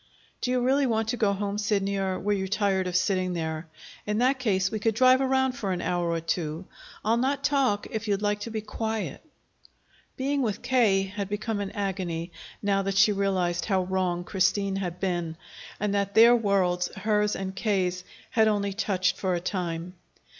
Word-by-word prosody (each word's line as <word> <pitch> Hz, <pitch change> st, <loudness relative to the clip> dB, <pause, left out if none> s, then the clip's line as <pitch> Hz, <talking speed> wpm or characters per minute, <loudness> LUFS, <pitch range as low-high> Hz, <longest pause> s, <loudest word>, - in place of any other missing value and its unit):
"Do -, -, -1 dB
you 250 Hz, 0 st, +1 dB
really 270 Hz, +2 st, +3 dB
want 225 Hz, -2 st, 0 dB
to 245 Hz, -, 0 dB
go 210 Hz, -3 st, +2 dB
home, 200 Hz, +1 st, -2 dB
Sidney, 200 Hz, -1 st, 0 dB
or 190 Hz, -1 st, -1 dB
were 205 Hz, +2 st, 0 dB
you 190 Hz, -1 st, -1 dB
tired 195 Hz, -2 st, +1 dB
of 180 Hz, -, -3 dB
sitting 185 Hz, -1 st, +1 dB
there? 160 Hz, -1 st, -3 dB, 0.4 s
In 210 Hz, 0 st, 0 dB
that 260 Hz, +3 st, +2 dB
case, 195 Hz, -5 st, +1 dB
we 215 Hz, -, -2 dB
could 220 Hz, 0 st, +1 dB
drive 255 Hz, +2 st, +5 dB
around 265 Hz, 0 st, +2 dB
for 220 Hz, -7 st, -3 dB
an 180 Hz, -, -1 dB
hour 175 Hz, -1 st, 0 dB
or 165 Hz, 0 st, 0 dB
two. 165 Hz, +1 st, -3 dB, 0.4 s
I'll 225 Hz, +2 st, +3 dB
not 270 Hz, +3 st, 0 dB
talk 270 Hz, -8 st, +2 dB
if 220 Hz, 0 st, -4 dB
you'd 200 Hz, -1 st, +1 dB
like 205 Hz, 0 st, 0 dB
to 210 Hz, -, -5 dB
be 220 Hz, -1 st, -3 dB
quiet." 220 Hz, 0 st, -4 dB, 1.0 s
Being 275 Hz, +2 st, 0 dB
with 220 Hz, -4 st, -2 dB
K. 235 Hz, -6 st, +3 dB
had 200 Hz, 0 st, -5 dB
become 210 Hz, +1 st, -2 dB
an 200 Hz, -1 st, -3 dB
agony, 185 Hz, -4 st, -3 dB, 0.3 s
now 200 Hz, -1 st, +2 dB
that 195 Hz, 0 st, -2 dB
she 210 Hz, +2 st, +6 dB
realized 190 Hz, -3 st, 0 dB
how 190 Hz, -3 st, +1 dB
wrong 180 Hz, -1 st, -1 dB
Christine 195 Hz, +1 st, +1 dB
had 180 Hz, -2 st, -4 dB
been, 175 Hz, -4 st, -2 dB, 0.4 s
and 210 Hz, -1 st, 0 dB
that 200 Hz, -1 st, -1 dB
their 235 Hz, +2 st, +8 dB
worlds, 190 Hz, -5 st, +1 dB
hers 210 Hz, +1 st, +1 dB
and 190 Hz, 0 st, -4 dB
K.'s, 185 Hz, -3 st, 0 dB, 0.3 s
had 220 Hz, -1 st, +4 dB
only 200 Hz, -2 st, 0 dB
touched 190 Hz, -3 st, 0 dB
for 185 Hz, -2 st, 0 dB
a -, -, -1 dB
time. 175 Hz, -1 st, -3 dB
200 Hz, 190 wpm, -27 LUFS, 185-220 Hz, 1.0 s, their